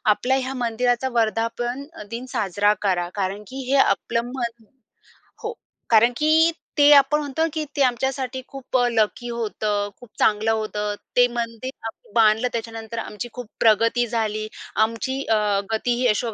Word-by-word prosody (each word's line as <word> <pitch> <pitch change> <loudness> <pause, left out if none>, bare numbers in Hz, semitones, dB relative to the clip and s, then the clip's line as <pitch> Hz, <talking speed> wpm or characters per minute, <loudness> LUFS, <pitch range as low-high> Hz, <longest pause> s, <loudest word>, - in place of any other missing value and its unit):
आपल्या 260 +4 +1
ह्या 260 0 -3
मंदिराचा 245 +2 +1
वर्धापन 230 +4 -1 0.3
दिन 235 +2 -5
साजरा 205 -1 +2
करा. 180 -3 0
कारण 200 +1 -2
की 265 +3 -6
हे 280 - +4
आपलं 215 +3 0
मन 235 -3 -4 0.8
हो. 450 +1 -3 0.4
कारण 235 +2 +5
की 315 +2 +4 0.3
ते 290 0 +7
आपण 300 +2 +4
म्हणतो 290 0 -3
की 315 -1 -1
ते - - +2
आमच्यासाठी 260 +1 -1
खूप 270 -2 -3
लकी 230 +2 0
होतं. 210 -3 -2
खूप 245 - -14
चांगलं 215 +1 +3
होतं. 210 -1 -2 0.2
ते 245 0 +7
मंदिर 230 +1 -4 0.3
बांधलं 220 +1 +4
त्याच्यानंतर 225 0 -5
आमची 225 +2 -6
खूप 245 -2 -7
प्रगती 230 +2 +3
झाली. 215 -2 -1 0.3
आमची 230 +5 0
अ, 210 -2 +2
गती 240 +2 0
ही 250 +1 +1
यशो 225 +1 0
230 Hz, 145 wpm, -23 LUFS, 215-255 Hz, 0.8 s, ते